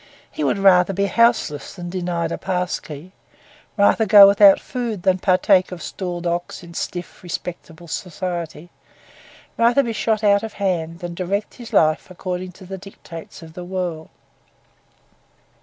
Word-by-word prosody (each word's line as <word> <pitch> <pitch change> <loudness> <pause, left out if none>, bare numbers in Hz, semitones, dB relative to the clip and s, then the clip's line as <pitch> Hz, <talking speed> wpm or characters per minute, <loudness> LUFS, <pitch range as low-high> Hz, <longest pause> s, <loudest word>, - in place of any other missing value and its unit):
He 310 - -4
would - - +1
rather 195 -1 +4
be 200 +2 0
houseless 200 -9 +1
than 175 -2 -7
denied 175 -2 -2
a - - -2
pass 180 -2 -2
key; 155 +4 -10 0.7
rather 215 +2 +3
go 200 0 +10
without 200 0 +6
food 235 -7 -4
than 185 -1 +2
partake 185 0 +3
of 180 - -7
stalled 175 -2 -5
ox 175 +1 -3
in 170 0 -12
stiff, 175 +1 -6
respectable 170 -1 -7
society; 175 -1 -5 0.9
rather 240 +4 +4
be 235 -2 -3
shot 215 0 -1
out 200 -1 +4
of 220 -1 -6
hand 170 -3 -2
than 175 -1 -5
direct 190 +4 -3
his 240 -3 -11
life 155 +2 +2
according 185 0 -5
to 190 - -14
the 190 +1 -7
dictates 170 -4 -11
of 160 -1 -12
the 180 - -8
world. 175 -3 -4
185 Hz, 155 wpm, -21 LUFS, 175-200 Hz, 0.9 s, go